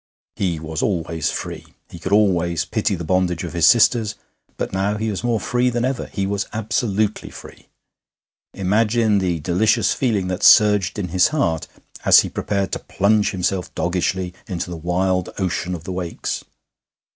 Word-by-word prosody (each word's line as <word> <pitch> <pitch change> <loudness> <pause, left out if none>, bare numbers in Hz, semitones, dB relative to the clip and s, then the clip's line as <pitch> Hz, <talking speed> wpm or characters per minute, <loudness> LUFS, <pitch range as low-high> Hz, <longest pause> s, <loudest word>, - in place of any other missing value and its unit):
He 90 -5 -1
was 80 0 -4
always 80 -4 -1
free; - - -6 0.2
he 85 - -9
could 90 - -5
always 90 -5 +2
pity - - -1
the 85 - -6
bondage 90 0 0
of 85 - -6
his 85 -2 +4
sisters; 110 0 +4 0.4
but - - -4
now 100 +2 0
he 110 0 -2
was 100 - -5
more 120 -2 +1
free 125 +2 +1
than 120 0 -1
ever 130 -1 -2
he 100 - -3
was 100 +1 -2
absolutely 110 -1 -1
free. - - -13 0.9
Imagine 105 +2 +2
the 90 -3 -1
delicious 95 +8 +2
feeling 105 -8 0
that 90 +2 -3
surged 105 -2 +5
in 95 -4 -3
his 90 +1 +4
heart 85 - -1 0.4
as - - +7
he - - -5
prepared 100 -2 -2
to - - -2
plunge 105 +1 +1
himself 90 -1 -2
doggishly 90 0 -1
into 90 -3 -4
the - - -4
wild 90 +2 -1
ocean 90 -1 -2
of 85 - -9
the 95 - -6
Wakes. 90 -2 -4
95 Hz, 170 wpm, -21 LUFS, 90-105 Hz, 0.9 s, as